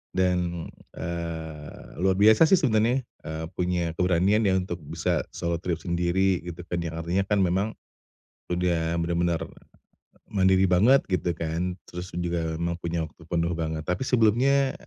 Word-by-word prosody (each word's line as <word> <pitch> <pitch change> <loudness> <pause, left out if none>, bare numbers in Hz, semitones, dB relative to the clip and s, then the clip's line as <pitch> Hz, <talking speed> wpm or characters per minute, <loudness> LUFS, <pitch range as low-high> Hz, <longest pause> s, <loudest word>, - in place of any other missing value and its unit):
dan, 90 -2 0 0.3
eee, 80 -3 -6
luar 95 +1 +2
biasa 110 +9 +6
sih 190 - +6
sebenarnya 120 +1 +2
eee, 80 -7 -7
punya 90 -2 0
keberanian 95 +4 +3
ya 95 - +3
untuk 90 -1 -4
bisa - - -1
solo 85 -1 -2
trip 85 -2 -2
sendiri 90 +1 +1
gitu 90 0 -7
kan, 85 - 0
yang 85 -1 -4
artinya 85 +4 0
kan 105 -1 +2
memang 95 +5 0 0.8
sudah 85 -2 0
benar-benar 85 0 0 0.9
mandiri 95 -1 +3
banget 105 +10 +4
gitu 90 -1 0
kan, 85 +3 -2
terus 90 +1 -7
dan 85 - -3
juga 85 0 -1 0.2
memang 85 0 -1
punya 85 -1 -2
waktu 80 - -18
penuh 85 0 0
banget. 80 -1 -2
Tapi 90 +8 -1
sebelumnya, 130 +4 +3
90 Hz, 150 wpm, -26 LUFS, 85-95 Hz, 0.9 s, biasa